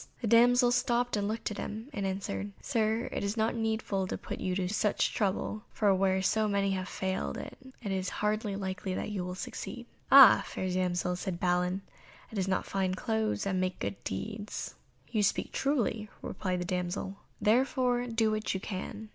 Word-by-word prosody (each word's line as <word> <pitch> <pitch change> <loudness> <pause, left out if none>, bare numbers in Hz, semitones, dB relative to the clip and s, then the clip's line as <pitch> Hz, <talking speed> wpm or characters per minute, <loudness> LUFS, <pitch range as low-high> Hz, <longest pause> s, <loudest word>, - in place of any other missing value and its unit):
The - - -4
damsel 240 +2 +6
stopped 245 0 +1
and 205 -1 0
looked 220 +1 -2
at 210 - -5
him, 220 +4 -5
and 200 -2 -1
answered, 100 - -3
"Sir, 220 - 0
it - - -2
is 200 +3 -2
not 220 +1 +2
needful 220 -4 -1
to - - -3
put - - -6
you 185 -1 -1
to 185 -1 0
such 210 +2 +1
trouble, 210 +1 -1
for 205 -3 +3
where 190 0 +2
so 215 +2 +2
many 200 -1 +1
have 185 -1 -2
failed 190 0 -2
it - - -7 0.3
is 190 -3 -1
hardly 210 -1 -1
likely 190 -1 -3
that - - -3
you 195 -3 -2
will 180 0 -4
succeed." 240 +5 -6 0.3
"Ah! 275 -2 +10
fair 185 - -3
damsel," 180 -1 0
said 180 -1 -4
Balin, 180 +1 +1 0.5
"it 215 - -3
is 190 - 0
not 190 - 0
fine 190 -1 0
clothes 220 0 -1
that 195 - -1
make 185 0 0
good 100 0 -4
deeds." 210 - -4 0.4
"You 215 - +2
speak 200 - +1
truly," 230 -6 0
replied 185 -2 -2
the - - -2
damsel, 180 +2 -2 0.2
"therefore 245 +1 +2
do 225 -2 +2
what 215 -2 -1
you - - -1
can." 205 +3 -6
200 Hz, 185 wpm, -30 LUFS, 185-220 Hz, 0.5 s, Ah